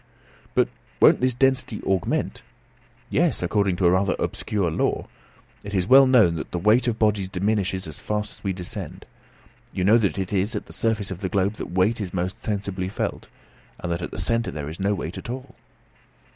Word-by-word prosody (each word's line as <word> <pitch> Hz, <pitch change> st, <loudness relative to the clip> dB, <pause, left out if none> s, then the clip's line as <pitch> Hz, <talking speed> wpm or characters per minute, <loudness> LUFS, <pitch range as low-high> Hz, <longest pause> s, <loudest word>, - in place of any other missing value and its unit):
"But -, -, +4 dB, 0.3 s
won't -, -, +6 dB
this 130 Hz, -1 st, +2 dB
density 130 Hz, -3 st, +1 dB
augment?" 95 Hz, -2 st, -1 dB, 0.7 s
"Yes; 160 Hz, -, +2 dB
according 100 Hz, 0 st, +1 dB
to 90 Hz, -, 0 dB
a 85 Hz, -, +6 dB
rather 95 Hz, +1 st, +2 dB
obscure 100 Hz, -6 st, -1 dB
law. -, -, 0 dB, 0.6 s
It 100 Hz, 0 st, -5 dB
is 90 Hz, -2 st, +1 dB
well 135 Hz, +5 st, +7 dB
known 110 Hz, -10 st, +5 dB
that -, -, -5 dB
the -, -, -3 dB
weight 105 Hz, +8 st, +3 dB
of 115 Hz, -2 st, 0 dB
bodies 105 Hz, -4 st, +1 dB
diminishes 95 Hz, -1 st, 0 dB
as 80 Hz, -2 st, -7 dB
fast 105 Hz, 0 st, -2 dB
as -, -, -26 dB
we 100 Hz, -, 0 dB
descend. 90 Hz, -1 st, -6 dB, 0.7 s
You 95 Hz, -, -2 dB
know 110 Hz, +5 st, +6 dB
that 100 Hz, -8 st, 0 dB
it 95 Hz, 0 st, -3 dB
is 100 Hz, +4 st, +1 dB
at 105 Hz, -, -3 dB
the -, -, -12 dB
surface 110 Hz, -4 st, -1 dB
of 95 Hz, -, -6 dB
the 95 Hz, -, -2 dB
globe 100 Hz, +2 st, +1 dB
that -, -, -6 dB
weight 105 Hz, +5 st, +2 dB
is 95 Hz, -2 st, -5 dB
most 90 Hz, +2 st, -3 dB
sensibly 100 Hz, -3 st, -3 dB
felt, -, -, -3 dB, 0.5 s
and 90 Hz, -, -4 dB
that 85 Hz, +1 st, -2 dB
at -, -, -4 dB
the -, -, -8 dB
centre 115 Hz, 0 st, +1 dB
there 75 Hz, -1 st, -5 dB
is 80 Hz, -, -9 dB
no 100 Hz, +1 st, +1 dB
weight 85 Hz, -1 st, -5 dB
at -, -, -9 dB
all." 130 Hz, +1 st, -6 dB
100 Hz, 200 wpm, -24 LUFS, 90-110 Hz, 0.7 s, well